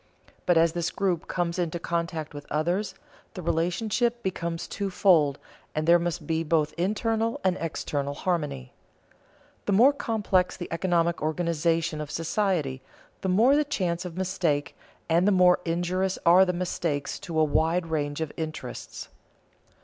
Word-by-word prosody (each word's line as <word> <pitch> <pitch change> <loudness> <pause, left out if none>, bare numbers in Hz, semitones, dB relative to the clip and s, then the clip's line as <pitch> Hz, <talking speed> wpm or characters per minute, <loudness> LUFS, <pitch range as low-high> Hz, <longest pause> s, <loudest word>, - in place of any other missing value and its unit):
But 175 -2 +4
as 165 0 +4
this 170 0 -1
group 185 -4 -1
comes 175 -1 -2
into 170 -1 -1
contact 170 -2 -3
with 145 0 -10
others, 175 +7 -1 0.4
the 185 - -6
relationship 215 +9 0
becomes 170 -3 -3
two 200 -1 -3
fold, 160 -7 +3 0.4
and 155 0 0
there 170 +1 +6
must 170 -1 -3
be 160 +1 0
both 155 -1 +1
internal 225 +5 0
and 185 -1 +2
external 145 -3 -3
harmony. 145 -7 -2 0.9
The 205 - +2
more 250 +8 +6
complex 205 -8 0
the 175 - -5
economic 170 0 +1
organization 165 0 0
of 150 - -6
society, 165 -6 -1 0.4
the 190 - -1
more 230 +9 +5
the 300 - +3
chance 180 - -2
of 180 -1 -7
mistake 175 -6 -1 0.3
and 170 +3 +3
the - - +5
more 180 -2 +5
injurious 180 +3 0
are 180 +3 +7
the 180 - +1
mistakes 170 -5 -2
to 165 -3 -5
a - - +5
wide 160 +3 +1
range 150 -2 -2
of 160 - -2
interests. 160 -1 -6
170 Hz, 150 wpm, -26 LUFS, 160-185 Hz, 0.9 s, are